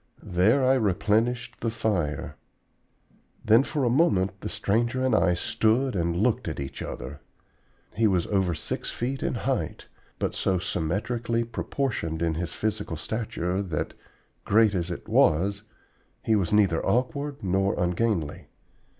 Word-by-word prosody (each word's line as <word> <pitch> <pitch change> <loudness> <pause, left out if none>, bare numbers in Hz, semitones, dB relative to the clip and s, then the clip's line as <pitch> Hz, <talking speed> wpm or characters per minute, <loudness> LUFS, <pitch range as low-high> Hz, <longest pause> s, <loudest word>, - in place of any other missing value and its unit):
There 110 +10 +4
I 130 - +5
replenished 115 +2 +1
the 115 - -1
fire. 100 -10 -2 1.1
Then 110 +3 +6
for 140 +1 -2
a 120 - +3
moment 100 - +2
the - - -4
stranger 120 +5 0
and 130 - +2
I 90 -4 +3
stood 115 +7 +1
and 85 -1 0
looked 110 +1 +1
at 75 - -4
each 70 -1 -6
other. 65 +4 -6 0.7
He 115 +1 +3
was 90 -4 +1
over 95 -4 +1
six - - -3
feet 130 +3 -3
in - - -1
height, - - -2 0.3
but - - -1
so 95 - 0
symmetrically 115 +8 -1
proportioned 115 - -2
in 80 -1 +1
his 85 +2 -3
physical 105 -6 -3
stature 95 0 -2
that, 85 -7 -3 0.5
great 110 0 +4
as 90 -2 -1
it 85 - -6
was, 100 +6 +3 0.6
he 110 - +2
was 95 -5 0
neither 100 -6 +3
awkward 140 +2 -1
nor 95 +1 +1
ungainly. 90 -3 -1
100 Hz, 140 wpm, -26 LUFS, 90-115 Hz, 1.1 s, Then